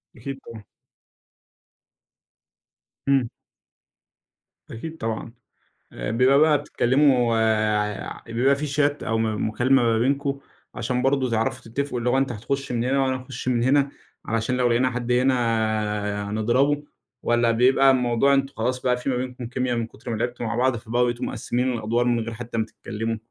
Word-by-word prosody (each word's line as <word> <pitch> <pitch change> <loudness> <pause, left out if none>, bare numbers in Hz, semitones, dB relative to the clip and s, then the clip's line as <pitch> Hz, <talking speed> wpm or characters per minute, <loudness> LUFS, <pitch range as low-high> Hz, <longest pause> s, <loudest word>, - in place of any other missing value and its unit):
أكيد 135 +3 -7
طبعًا. 110 -2 -10 2.5
إمم. 130 -4 +3 1.4
أكيد 160 +8 -7
طبعًا، 115 -1 -4 0.6
آآ، - - -4
بيبقى 130 +4 +4
بقى 155 -1 +5
بتتكلموا 125 -3 +2
غ 110 -2 0
بيبقى 125 +4 +2
في 150 +1 -3
شات 145 +1 0
أو 115 0 0
م 110 -1 0
مكالمة 130 +3 +3
ما 115 -1 +2
بينكم؛ 140 +2 0 0.4
عشان 125 +1 -1
برضو 135 -1 +1
تعرفوا 115 0 -1
تتفقوا، 140 -1 -2
اللي 120 +1 0
هو 130 - +2
أنتَ 135 -2 +1
هتخُش 135 +5 -3
من 120 -1 0
هنا 135 +2 +1
وأنا 130 -1 0
هاخُش 125 -1 -8
من 120 -2 +2
هنا، 140 +2 +3 0.4
علشان 115 +3 -1
لو 125 -1 +2
لقينا 125 +2 +2
حد 125 0 -3
هنا 110 -5 0
نضربه؟ 130 +7 +1 0.4
والّا 120 0 +3
بيبقى 130 +3 +5
الموضوع 125 +1 +2
أنتم 135 0 +1
خلاص 125 +3 -1
بقى 125 -1 +1
في 125 +2 -3
ما 125 - 0
بينكم 125 -1 -5
كميا 125 0 -1
من 115 -1 -2
كُتر 115 - -11
ما 115 - -1
لعبتوا 120 +1 -3
مع 115 +1 -2
بعض، 130 +1 +2
فبقيتوا 120 +2 -1
مقسمين 125 +1 -1
الأدوار 115 +2 0
من 120 -1 +2
غير 115 0 -4
حتى 115 0 -6
ما 110 - +1
تتكلموا؟ 115 0 -5
120 Hz, 160 wpm, -24 LUFS, 115-130 Hz, 2.5 s, بقى